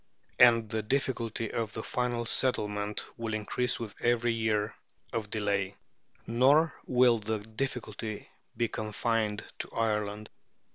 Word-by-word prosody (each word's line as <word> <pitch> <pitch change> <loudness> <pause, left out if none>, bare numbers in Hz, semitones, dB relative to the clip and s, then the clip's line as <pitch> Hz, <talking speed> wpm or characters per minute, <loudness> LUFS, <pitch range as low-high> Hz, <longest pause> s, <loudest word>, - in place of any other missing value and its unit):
And 115 -2 +7
the 110 +1 -1
difficulty 115 -2 -1
of 115 -3 -2
the 110 - -4
final 120 -1 -1
settlement 105 -4 0
will 115 -2 -2
increase 120 +3 -1
with 115 -3 -5
every 120 0 +2
year 110 -1 0 0.4
of 110 -2 -2
delay. 100 -2 0 0.5
Nor 140 +7 +4
will 125 -2 +5
the 110 +1 -1
difficulty 110 -1 -4 0.3
be 120 0 +2
confined 110 0 -1
to - - -4
Ireland. 105 -1 -1
110 Hz, 125 wpm, -30 LUFS, 105-120 Hz, 0.5 s, And